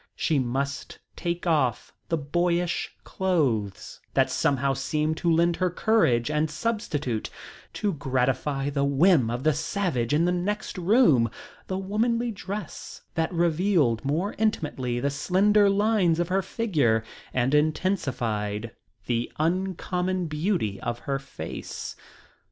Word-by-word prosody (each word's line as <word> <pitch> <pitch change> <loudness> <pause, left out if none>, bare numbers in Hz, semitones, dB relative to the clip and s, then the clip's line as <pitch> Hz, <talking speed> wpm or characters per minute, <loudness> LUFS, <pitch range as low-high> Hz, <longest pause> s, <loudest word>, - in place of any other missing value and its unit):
She 155 -4 +1
must 135 +3 -3 0.2
take 175 0 -3
off 145 -9 +1 0.2
the 165 - +1
boyish 175 +3 0
clothes 135 - -1 0.2
that - - +3
somehow 140 0 +1
seemed 150 +4 -1
to 170 - +1
lend 170 +1 +3
her 185 -1 +1
courage 160 - +2
and 150 +1 +1
substitute, 150 - -2 0.4
to 205 -2 -1
gratify 135 0 0
the 140 -1 0
whim 140 -2 +4
of 120 +2 -3
the 155 0 +4
savage 150 - -1
in 155 +3 +3
the 180 - +2
next 195 +4 -2
room, 170 - +4 0.4
the 185 - -2
womanly 230 +5 0
dress 195 -3 -7
that 160 0 0
revealed 170 - +2
more 160 +9 -1
intimately 145 - 0
the 140 +3 0
slender 200 +7 +3
lines 200 -4 +2
of 175 0 0
her 190 +1 +2
figure 150 - +1 0.3
and 130 +2 +1
intensified 125 - 0 0.3
the 120 -1 -1
uncommon 180 +2 -1
beauty 155 - -1
of 120 0 -2
her 135 +2 -3
face. 135 - -7
160 Hz, 130 wpm, -26 LUFS, 135-185 Hz, 0.4 s, whim